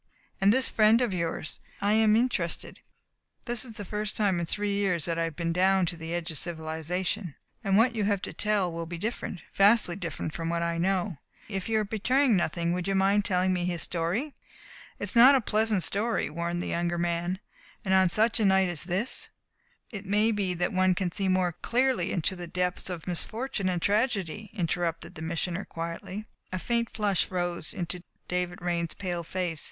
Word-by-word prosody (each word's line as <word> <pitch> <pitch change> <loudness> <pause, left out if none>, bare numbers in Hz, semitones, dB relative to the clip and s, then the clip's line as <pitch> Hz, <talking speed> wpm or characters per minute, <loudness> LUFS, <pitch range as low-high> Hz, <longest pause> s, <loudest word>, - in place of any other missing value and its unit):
And 195 +1 +6
this 260 +3 +3
friend 220 +1 +5
of 245 -6 0
yours? 165 -3 -3 0.2
I 205 +1 +2
am 215 -1 +5
interested. 220 -8 -1 0.7
This 240 -2 -1
is 240 -3 -7
the 210 -2 -7
first 210 +1 -3
time 195 -5 +2
in 170 - -2
three 205 +3 -1
years 185 -6 +1
that 165 -1 -1
I 165 - +2
have 165 -2 -5
been 170 0 -1
down 190 +1 +3
to 170 - -2
the 165 0 -7
edge 170 0 -3
of 155 - -3
civilization, 170 +2 -3 0.3
and 195 -2 +3
what 230 +2 +4
you 215 -3 0
have 200 -1 +2
to - - -4
tell 205 -4 +1
will 165 0 -5
be 170 +1 -5
different 195 -3 -4
vastly 200 -3 +4
different 170 -4 -4
from 165 0 -3
what 170 0 0
I 170 0 -1
know. 185 -1 0 0.3
If 195 -1 -4
you 220 - +2
are - - 0
betraying 235 +4 +2
nothing 170 -1 0
would 180 +1 -2
you 195 - +1
mind 195 +1 +3
telling 185 -1 +2
me 175 -1 -1
his 175 -2 -1
story?" 180 - -1 0.6
"It - - -7
is - - -1
not 255 +4 +9
a - - +5
pleasant 215 -4 +1
story," 215 -5 0
warned 170 +2 -2
the - - -4
younger 175 0 0
man, 175 +1 -1 0.5
"and 190 - +2
on 190 -1 +5
such 220 +5 +3
a 215 - +3
night 190 -1 +4
as 170 -3 -3
this 190 +7 -1 0.3
" 480 0 -34
"It 200 -3 -6
may 210 +3 +3
be 195 -4 -1
that 175 +2 -1
one 185 0 +3
can 180 -1 -1
see 195 +2 -1
more 185 -1 +2
clearly 235 +2 0
into 185 +2 0
the 175 -1 -7
depths 180 +1 -1
of 175 -3 -5
misfortune 200 +3 0
and 180 -1 0
tragedy," 210 -1 0
interrupted 170 -3 -2
the 160 - -9
Missioner 170 +3 -2
quietly. 170 +5 -6 0.3
A 185 - -2
faint 235 +4 0
flush 205 -4 0
rose 175 -3 -2
into 180 -1 -4 0.3
David 180 0 -2
Raine's 170 -2 -1
pale 175 -3 -3
face. 175 -2 -2
185 Hz, 200 wpm, -28 LUFS, 170-210 Hz, 0.7 s, not